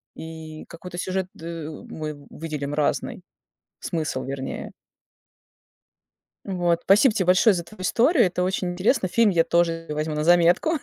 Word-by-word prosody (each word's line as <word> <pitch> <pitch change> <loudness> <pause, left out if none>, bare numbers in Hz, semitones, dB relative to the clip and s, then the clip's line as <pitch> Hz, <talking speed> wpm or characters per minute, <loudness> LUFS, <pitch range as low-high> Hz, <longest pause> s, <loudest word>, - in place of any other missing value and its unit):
И 160 -1 -9
какой-то 175 +1 -9
сюжет, 185 +1 -2
ы, 165 -2 -7
мы 150 -2 -7
выделим 150 -3 -5
разный. 150 -1 -1 0.6
Смысл, 155 -5 -2
вернее. 135 0 -5 1.7
Вот, 175 -3 0
спасибо 210 +6 +6
тебе 190 - +1
большое 185 +4 +5
за 170 - -3
твою 200 +3 -13
историю. 240 - +3
Это 180 0 -2
очень 185 -1 -1
интересно, 190 +3 +1
фильм 225 +3 +3
я 170 -3 +3
тоже 165 -1 +1
возьму 155 +1 -2
на 150 0 -1
заметку, 175 - +4
170 Hz, 140 wpm, -24 LUFS, 155-185 Hz, 1.7 s, спасибо